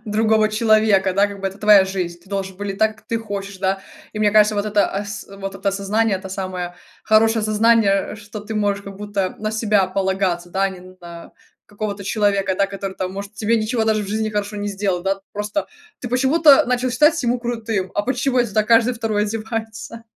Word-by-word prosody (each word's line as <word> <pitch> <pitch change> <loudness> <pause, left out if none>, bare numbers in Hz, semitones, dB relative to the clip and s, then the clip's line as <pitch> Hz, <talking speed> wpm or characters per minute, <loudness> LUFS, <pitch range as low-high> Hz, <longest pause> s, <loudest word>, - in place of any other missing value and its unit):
другого 215 0 +2
человека, 215 -3 +3
да, 200 +1 +4
как 200 -1 -9
бы, 195 - -2
это 195 +1 -5
твоя 210 -2 +6
жизнь, 180 -3 -4
ты 190 - -21
должен 195 -2 -4
выглядеть 200 -1 -5
так, 220 0 +2
как - - -23
ты 230 - -1
хочешь, 200 -2 -6
да. 195 0 0 0.3
И 215 - -6
мне 210 -1 +3
кажется, 210 0 +5
вот 205 +1 -1
это 205 -1 +2
ас 200 0 -5
вот 195 0 -7
это 195 +1 -2
осознание- 200 +1 0
это 190 0 -9
самое 185 -2 -5 0.3
хорошее 220 +1 +4
осознание, 215 -2 +2
что 205 0 -9
ты 215 +2 -7
можешь, 205 -1 0
как 200 -1 -9
будто, 205 -2 -3
на 215 0 -2
себя 215 -3 +2
полагаться, 190 -2 -1
да, 195 +2 +1
не 185 -2 -9 0.2
на 170 -1 -11 0.3
какого-то 205 -1 -5
человека, 200 -2 +1
да, 200 +1 +2
который 195 -1 -6
там 185 0 -3
может 200 +1 -7
тебе 215 +2 0
ничего 220 +1 0
даже 215 -1 +1
в - - -6
жизни 220 +1 -1
хорошего 205 0 -3
не 205 - -2
сделал. 195 -3 -2
Да, 195 +1 -1
просто 210 +8 -3 0.3
ты 245 - -5
почему-то 280 +3 +5
начал 250 0 0
считать 300 +6 +3
ему 245 +1 +1
крутым, 225 -6 -3
а 205 - +1
почему, 255 +2 0
это 240 -4 +1
так 215 0 +1
каждый 230 +2 +5
2 220 -3 -1
одевается. 225 +1 -5
205 Hz, 205 wpm, -20 LUFS, 195-220 Hz, 0.3 s, твоя